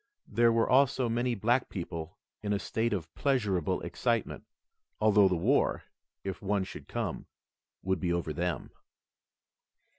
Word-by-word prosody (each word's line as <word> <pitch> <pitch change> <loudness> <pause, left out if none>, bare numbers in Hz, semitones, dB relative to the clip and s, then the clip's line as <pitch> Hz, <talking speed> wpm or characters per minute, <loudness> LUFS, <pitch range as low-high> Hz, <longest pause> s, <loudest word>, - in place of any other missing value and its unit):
There 115 0 +4
were 115 0 +2
also 130 -1 +4
many 120 +1 0
black 120 +5 +1
people 85 -3 -6 0.2
in 105 -1 -1
a - - +2
state 115 +3 -1
of 85 -6 -3
pleasurable 105 - 0
excitement, - - -1 0.5
although 105 -2 +5
the 90 - +1
war 85 - +2 0.4
if 95 -1 -4
one 100 0 0
should - - -9
come - - -3 0.6
would 95 -1 0
be 85 +2 0
over 85 -3 -1
them. 90 +3 -2
100 Hz, 140 wpm, -30 LUFS, 90-115 Hz, 0.6 s, although